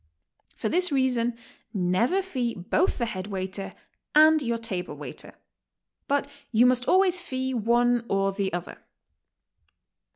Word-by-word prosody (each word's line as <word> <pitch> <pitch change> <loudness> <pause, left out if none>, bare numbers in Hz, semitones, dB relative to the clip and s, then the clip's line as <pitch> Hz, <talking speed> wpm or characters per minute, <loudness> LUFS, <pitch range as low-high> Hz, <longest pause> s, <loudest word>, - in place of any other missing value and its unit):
For - - -3
this 360 +7 +2
reason, 250 -3 +1 0.4
never 205 - +1
fee 255 -10 -2
both 195 - 0
the 235 - 0
head 190 -4 -5
waiter 190 0 -5 0.4
and 310 0 +7
your 235 -3 -1
table 190 -6 -4
waiter. - - -9 0.7
But 285 0 +1 0.2
you 235 +1 +5
must 250 0 +2
always 370 -1 +3
fee 260 -5 -3
one 240 +1 +2
or 195 0 +1
the 195 -1 -2
Other. 175 0 -5
240 Hz, 130 wpm, -26 LUFS, 195-275 Hz, 0.7 s, and